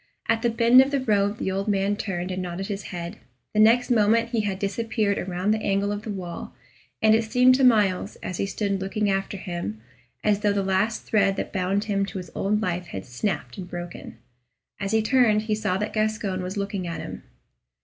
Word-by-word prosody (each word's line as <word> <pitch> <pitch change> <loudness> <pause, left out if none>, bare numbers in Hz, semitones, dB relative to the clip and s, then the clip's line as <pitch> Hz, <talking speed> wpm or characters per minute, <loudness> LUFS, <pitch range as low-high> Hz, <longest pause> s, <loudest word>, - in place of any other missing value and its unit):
At 225 - +2
the 235 - +2
bend 235 +2 +6
of 265 - +2
the 280 -1 0
road 205 -4 +1
the 190 - -2
old 195 +2 -2
man 200 0 +1
turned 185 -3 -3
and 185 0 -3
nodded 185 +3 -5
his 200 -1 -4
head; 175 +2 -6 0.3
the 210 - +1
next 240 +4 +5
moment 230 +1 +3
he 235 -2 0
had 200 -2 -2
disappeared 205 +1 -1
around 185 +2 -1
the 215 0 +1
angle 200 0 0
of 205 0 -3
the 215 - -8
wall, 180 -4 -6 0.5
and 220 0 +6
it 225 +1 +3
seemed 250 +3 +5
to 265 +1 +2
Myles, 210 -7 +3
as 180 - -4
he 195 - -1
stood 200 -1 -2
looking 200 +1 0
after 195 +1 -2
him, 175 - -5 0.4
as 210 -1 +2
though 205 -1 +2
the 200 -1 0
last 195 +4 0
thread 200 -2 +2
that - - -4
bound 195 +1 0
him 200 -2 0
to 195 - -6
his 180 -2 -7
old 210 +2 0
life 180 -2 -2
had 95 - -6
snapped 190 - -3
and 180 -1 -7
broken. 175 -7 -7 0.6
As 195 -1 -2
he 220 -1 +2
turned 220 -3 +3
he 215 0 -1
saw 210 -3 0
that 210 +2 -3
Gascoyne 215 -3 -1
was 185 +3 -5
looking 200 -2 -3
at 170 - -4
him. - - -7
200 Hz, 215 wpm, -25 LUFS, 190-220 Hz, 0.6 s, bend